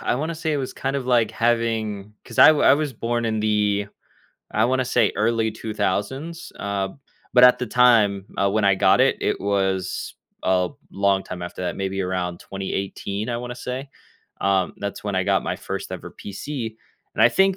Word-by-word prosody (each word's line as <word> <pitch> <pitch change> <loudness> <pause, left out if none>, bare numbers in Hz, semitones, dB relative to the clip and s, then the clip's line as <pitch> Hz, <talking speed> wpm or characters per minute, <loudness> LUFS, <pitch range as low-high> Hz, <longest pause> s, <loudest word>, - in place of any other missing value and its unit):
I - - 0
wanna 155 +5 -2
say 160 -1 -2
it - - +1
was 130 -2 -3
kind 135 +1 -2
of, 130 -2 -4
like, 120 -3 +3
having 110 -3 -1
'cause 115 - -11
I - - +10
w 155 -2 +4
I - - +7
was 150 -2 -2
born 120 +1 -2
in 110 -1 0
the 105 -1 +1 0.7
I - - +3
wanna 130 +1 +1
say - - +2
early 110 +1 +1
2000's, 110 - -3
uh, 100 -1 -2 0.4
but 125 0 +7
at 125 - +7
the 125 - -2
time 105 -5 +4 0.2
when 105 +1 +1
I 100 -1 +5
got - - +4
it, - - +4
it - - -1
was 95 -2 -1 0.3
a 90 -1 +2 0.2
long 100 -1 +1
time 90 -2 -7
after 90 +1 -6
that, 90 - -2
maybe 95 0 -2
around 90 -1 -3
2018, 100 +2 -4
I 120 - -1
wanna 125 +1 -5
say, 130 +3 -5 0.5
um, 95 -1 +1
that's 100 +1 -5
when 100 - -2
I 95 - +2
got - - +2
my - - -2
first - - -5
ever - - -7
PC, 115 +2 -6 0.4
and 110 - +2
I 115 - +8
think 190 +8 +3
110 Hz, 190 wpm, -23 LUFS, 100-125 Hz, 0.7 s, I